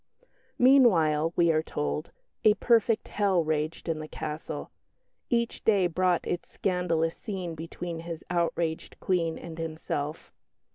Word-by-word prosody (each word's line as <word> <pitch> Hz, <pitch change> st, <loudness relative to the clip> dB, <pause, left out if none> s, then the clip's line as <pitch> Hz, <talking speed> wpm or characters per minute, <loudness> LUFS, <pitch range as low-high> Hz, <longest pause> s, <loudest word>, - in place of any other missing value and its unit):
Meanwhile, 170 Hz, -, +5 dB
we 170 Hz, -1 st, +4 dB
are 155 Hz, -1 st, +2 dB
told, 150 Hz, 0 st, -3 dB, 0.3 s
"a 210 Hz, -1 st, +6 dB
perfect 230 Hz, -2 st, +2 dB
hell" 195 Hz, -4 st, +2 dB
raged 155 Hz, +2 st, -2 dB
in 160 Hz, -2 st, -1 dB
the 155 Hz, -, -6 dB
castle; 155 Hz, 0 st, -5 dB, 0.6 s
each 235 Hz, -1 st, 0 dB
day 200 Hz, -4 st, +4 dB
brought 180 Hz, 0 st, +1 dB
its 175 Hz, -, -3 dB
scandalous 170 Hz, -3 st, 0 dB
scene 190 Hz, -7 st, -5 dB
between 165 Hz, +1 st, -6 dB
his 165 Hz, -1 st, -6 dB
outraged 170 Hz, -2 st, -1 dB
Queen 170 Hz, -3 st, 0 dB
and 165 Hz, -1 st, -9 dB
himself. 155 Hz, -2 st, -4 dB
170 Hz, 130 wpm, -28 LUFS, 160-185 Hz, 0.6 s, a